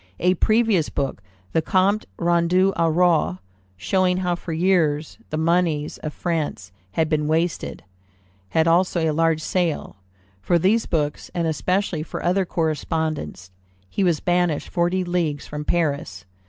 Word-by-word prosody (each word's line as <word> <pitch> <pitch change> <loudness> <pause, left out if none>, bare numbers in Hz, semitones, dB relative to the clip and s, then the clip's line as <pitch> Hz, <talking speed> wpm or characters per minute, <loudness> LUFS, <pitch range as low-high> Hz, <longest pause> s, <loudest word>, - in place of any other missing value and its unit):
A 180 +1 +3
previous 215 -3 +2
book, 135 -7 -3 0.3
the 160 - +3
Compte 195 +5 +1
Rendu 175 +3 +2
au 165 -1 +2
Roi, 165 - +2 0.4
showing 180 - +1
how 180 -1 0
for 175 0 -6
years 160 -3 +1
the 155 - -3
moneys 160 -2 +1
of 155 - -4
France 155 - -3 0.2
had 160 - +1
been 150 -1 0
wasted, 165 +2 -1 0.7
had 160 0 +2
also 175 +1 +3
a 155 - +1
large 165 0 +2
sale. 170 - -1 0.4
For 170 - +2
these 200 +7 +2
books, 150 -3 -2
and 170 -1 0
especially 180 +1 0
for 155 - -6
other 185 +2 +2
correspondence, 155 - -2 0.4
he 200 - 0
was 170 -5 +2
banished 175 -3 0
forty 180 +1 +1
leagues 170 -5 -1
from 150 0 -5
Paris. 140 - -1
165 Hz, 140 wpm, -23 LUFS, 155-180 Hz, 0.7 s, A